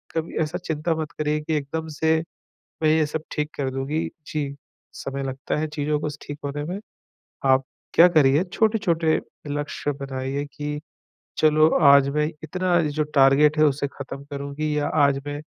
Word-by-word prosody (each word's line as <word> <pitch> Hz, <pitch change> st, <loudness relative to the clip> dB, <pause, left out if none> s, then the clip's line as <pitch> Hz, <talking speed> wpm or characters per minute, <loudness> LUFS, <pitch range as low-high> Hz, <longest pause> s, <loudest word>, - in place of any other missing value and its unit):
कभी 160 Hz, 0 st, -2 dB
ऐसा 155 Hz, +3 st, -3 dB
चिंता 165 Hz, -2 st, -1 dB
मत 160 Hz, -1 st, -4 dB
करिए 150 Hz, 0 st, -1 dB
कि 155 Hz, +1 st, -3 dB
एकदम 160 Hz, +3 st, -4 dB
से 160 Hz, 0 st, +3 dB, 0.7 s
मैं 155 Hz, -, +4 dB
ये 155 Hz, -1 st, +3 dB
सब 155 Hz, +1 st, -4 dB
ठीक 150 Hz, 0 st, -2 dB
कर 135 Hz, -2 st, -1 dB
दूँगी। 135 Hz, +4 st, -2 dB, 0.2 s
जी, 140 Hz, -2 st, -3 dB, 0.4 s
समय 135 Hz, 0 st, -5 dB
लगता 135 Hz, 0 st, -3 dB
है 155 Hz, -, 0 dB
चीज़ों 150 Hz, 0 st, -1 dB
को 150 Hz, -, -2 dB
स 145 Hz, -, -10 dB
ठीक 145 Hz, 0 st, -7 dB
होने 145 Hz, +1 st, -3 dB
में। 180 Hz, +5 st, -4 dB, 0.7 s
आप 130 Hz, 0 st, +4 dB, 0.3 s
क्या 170 Hz, -, +8 dB
करिए 150 Hz, -1 st, +4 dB
छोटे-छोटे 175 Hz, -8 st, +2 dB, 0.3 s
लक्ष्य 145 Hz, 0 st, -2 dB
बनाइए 135 Hz, +1 st, -3 dB
कि, 150 Hz, 0 st, -4 dB, 0.6 s
चलो 155 Hz, 0 st, +5 dB
आज 140 Hz, -1 st, +7 dB
मैं 150 Hz, +1 st, +1 dB, 0.2 s
इतना 180 Hz, +1 st, +1 dB
जो 155 Hz, -1 st, 0 dB
टारगेट 140 Hz, +3 st, +5 dB
हैं 155 Hz, -, +6 dB
उसे 140 Hz, -1 st, +1 dB
ख़त्म 140 Hz, 0 st, -8 dB
करूँगी 140 Hz, +2 st, -3 dB
या 145 Hz, -, 0 dB
आज 140 Hz, -2 st, +4 dB
मैं 145 Hz, 0 st, -4 dB
150 Hz, 170 wpm, -24 LUFS, 140-155 Hz, 0.7 s, क्या